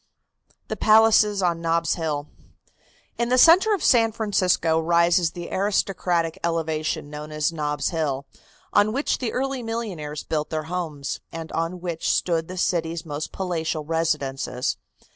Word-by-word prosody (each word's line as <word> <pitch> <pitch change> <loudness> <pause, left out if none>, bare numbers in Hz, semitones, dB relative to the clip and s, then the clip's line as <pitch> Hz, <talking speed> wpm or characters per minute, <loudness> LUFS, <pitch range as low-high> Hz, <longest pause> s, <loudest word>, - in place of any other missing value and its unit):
THE - - -3
PALACES 215 -2 +4
ON 170 -2 +1
NOB'S 165 0 +1
HILL. 150 -4 -2 0.9
In 235 0 0
the 255 - +3
centre 345 - +7
of 380 - -6
San 230 -3 +4
Francisco 185 -7 +1
rises 170 0 +3
the 175 -1 -7
aristocratic 185 -4 0
elevation 160 -3 -2
known 150 +1 -7
as 155 +1 0
Nob's 150 -2 -1
Hill, 145 -5 -2 0.5
on 205 +1 +4
which 280 +4 0
the 240 -4 -2
early 270 0 -2
millionaires 195 -11 -4
built 155 -1 -2
their 155 -1 -2
homes, 160 -4 -4
and 165 -1 -7
on 165 +2 -3
which 170 -2 -3
stood 165 -2 +1
the 185 - -7
city's 165 -2 -1
most 150 0 -5
palatial 160 -4 -3
residences. 145 -5 -1
165 Hz, 145 wpm, -24 LUFS, 155-200 Hz, 0.9 s, centre